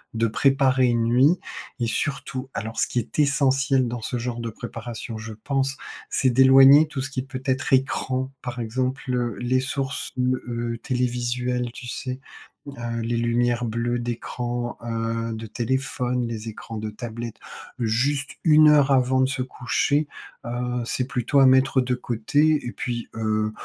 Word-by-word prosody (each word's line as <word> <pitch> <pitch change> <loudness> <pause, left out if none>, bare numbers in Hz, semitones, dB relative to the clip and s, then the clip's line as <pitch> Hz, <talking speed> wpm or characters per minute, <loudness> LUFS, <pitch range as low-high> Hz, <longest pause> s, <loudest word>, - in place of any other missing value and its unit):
de 115 0 +2
préparer 135 +2 +3
une 120 -1 +2
nuit. 130 +9 +4 0.4
Et 115 - +1
surtout 135 0 -3
alors 110 +1 -4
ce - - +2
qui 125 - -1
est 120 +6 -6
essentiel 135 -2 +3
dans 120 0 -5
ce 125 - -3
genre 120 0 -4
de 115 - -3
préparation, 115 +1 -7
je 110 0 -7
pense, 135 +4 -1 0.3
c'est 130 - +2
d'éloigner 135 +4 +7
tout 145 -3 -4
ce 135 - -4
qui 130 -2 -3
peut 130 -1 -7
être 130 +1 0
écran 130 0 +1
par 125 -1 -5
exemple. 130 +3 -2
Heu, 120 -1 -1
les 125 +1 +1
sources, 135 0 -3
heu 125 0 +1
heu, 120 -1 -3
télévisuelles, 125 -1 -1
tu 125 - -9
sais? 130 +1 -4 0.5
Heu, 120 -4 -4
les 115 +1 -1
lumières 120 +1 +1
bleues 120 +2 -1
d'écran, 120 0 -4
heu, 115 0 -2
de 110 0 -7
téléphone, 125 +1 -1
les 115 -1 -5
écrans 110 +1 -8
de 110 0 -4
tablette 115 +2 -7 0.7
juste 135 +5 0
1 155 -1 +7
heure 145 -2 +5
avant 130 -1 +3
de - - +4
se 135 0 -2
coucher, 135 +4 0 0.4
heu, 125 +1 -2
c'est 125 - 0
plutôt 125 +1 +1
à 135 - +7
mettre 130 0 +4
de 125 0 -1
côté. 145 +6 +1
Et 120 - -3
puis, 120 -1 -4
heu, 110 -1 0
125 Hz, 165 wpm, -24 LUFS, 120-135 Hz, 0.7 s, d'éloigner